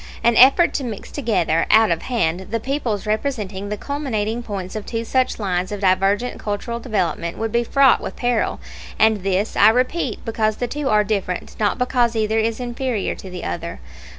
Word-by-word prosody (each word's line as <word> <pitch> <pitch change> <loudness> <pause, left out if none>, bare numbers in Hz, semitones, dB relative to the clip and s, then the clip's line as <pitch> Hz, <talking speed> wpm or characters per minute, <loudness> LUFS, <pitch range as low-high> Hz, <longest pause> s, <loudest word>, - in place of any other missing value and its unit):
An 235 0 +4
effort 270 +9 +6
to 280 - -2
mix 225 -5 -6
together, 185 - 0
out 220 -3 +5
of 165 - 0
hand, 190 -7 -1
the 230 +2 -1
peoples 235 -5 -2
representing 210 -4 -2
the 210 - -3
culminating 240 -5 -2
points 195 -5 -6
of 215 - -4
two 230 +1 -4
such 255 +2 +1
lines 185 -3 -2
of 205 -1 -5
divergent 195 +5 +1
cultural 215 +3 -3
development 180 -8 -2
would 225 0 -2
be 235 +1 +2
fraught 270 +1 +4
with - - -6
peril; 245 -2 0 0.4
and 220 -2 +3
this, 195 +2 -1
I 205 - +7
repeat, 255 +2 -1
because 215 -1 0
the 245 - -1
two 290 +1 -3
are 210 0 +4
different, 195 -4 -3
not 210 -2 +1
because 250 -2 +1
either 220 0 +1
is 225 +1 -1
inferior 245 -3 -2
to 190 - -10
the 180 -1 -7
other. 85 -6 -5
220 Hz, 185 wpm, -21 LUFS, 200-245 Hz, 0.4 s, I